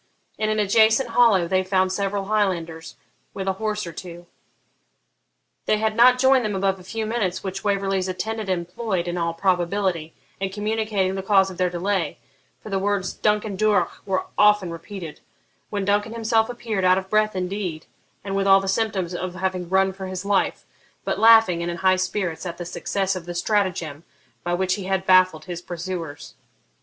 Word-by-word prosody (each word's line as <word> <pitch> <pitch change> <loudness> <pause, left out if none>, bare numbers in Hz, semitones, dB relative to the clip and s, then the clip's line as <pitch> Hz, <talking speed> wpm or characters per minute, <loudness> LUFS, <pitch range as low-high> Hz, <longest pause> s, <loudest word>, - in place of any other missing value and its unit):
In 215 0 0
an 215 - 0
adjacent 220 +4 +3
hollow 225 -7 +4
they 185 +1 +1
found 185 0 +1
several 200 0 -2
Highlanders, 175 -6 -1 0.4
with 195 0 -4
a 190 - +2
horse 210 -2 -1
or 170 - -7
two. 175 +1 -9 1.4
They 215 - +3
had 215 0 0
not 250 +2 +6
joined 260 0 +4
them 210 -2 -2
above 195 0 0
a - - -13
few 220 +4 -4
minutes, 215 -5 -2
which 190 -1 -5
Waverley's 195 -2 0
attendant 215 +3 -4
employed, 180 +1 -2
in 175 - -2
all 170 -1 -1
probability, 180 -2 0 0.2
in 195 0 -1
communicating 210 -1 -1
the 190 - -3
cause 195 -1 +3
of 180 - -11
their 180 0 +2
delay 180 +1 -1 0.4
(for 215 - -10
the 195 - +1
words 195 -1 -1
'Duncan 210 -1 0
Duroch' 200 -3 +1
were 190 -1 0
often 210 -4 +4
repeated), 170 -1 -8 0.5
when 200 -2 -2
Duncan 205 +2 +1
himself 225 0 +1
appeared, 225 -5 -3
out 185 0 +5
of 190 0 -3
breath 215 0 +1
indeed, 180 -3 -3 0.4
and 195 0 -4
with 195 0 +1
all 195 0 +7
the 195 - -5
symptoms 195 -3 -1
of 180 0 -4
having 185 -2 -3
run 190 0 +2
for 190 0 -7
his 185 +1 -5
life, 200 -1 0 0.4
but - - -1
laughing, 225 -6 +6
and 170 - -2
in 170 - -4
high 185 +1 +3
spirits 185 -2 -2
at 170 -1 -6
the 175 - -6
success 195 +2 -2
of 175 -2 -7
the 175 - -5
stratagem 175 -6 -1 0.4
by 175 0 0
which 185 +1 0
he 200 -3 -4
had 190 0 -1
baffled 185 -4 +4
his 175 -2 -6
pursuers. 175 -3 -6
190 Hz, 185 wpm, -23 LUFS, 180-210 Hz, 1.4 s, all